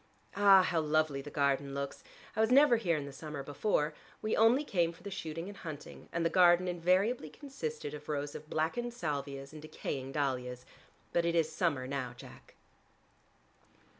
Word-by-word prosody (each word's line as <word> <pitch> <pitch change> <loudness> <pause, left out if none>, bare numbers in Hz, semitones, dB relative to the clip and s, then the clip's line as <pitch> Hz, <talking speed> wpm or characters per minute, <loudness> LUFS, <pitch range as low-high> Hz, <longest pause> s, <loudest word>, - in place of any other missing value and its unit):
Ah, 195 -2 +7
how 175 -2 +1
lovely 155 -2 +1
the 145 - -8
garden 140 -1 0
looks! 140 0 -4 0.3
I 220 - +2
was 220 - +3
never 270 -1 +6
here 175 -8 +1
in 145 - -4
the 140 - -8
summer 150 -1 -6
before: 150 +1 0 0.3
we 215 - -1
only 230 +6 +5
came 175 - +1
for 165 - -17
the 200 - -6
shooting 165 -1 -5
and 205 - -8
hunting 155 -6 -9
and 170 0 -1
the - - +4
garden 175 0 +5
invariably 180 +3 +1
consisted 290 - -6
of 150 0 -9
rows 145 0 -2
of 155 - -9
blackened 235 +10 -1
salvias 140 - -4
and 155 - -9
decaying 135 -3 -5
dahlias. 125 -3 -2 0.5
But 170 - +3
it 170 0 +1
is 160 -1 +2
summer 155 -6 0
now, 130 -2 -4
Jack." - - -14
160 Hz, 175 wpm, -32 LUFS, 140-190 Hz, 0.5 s, Ah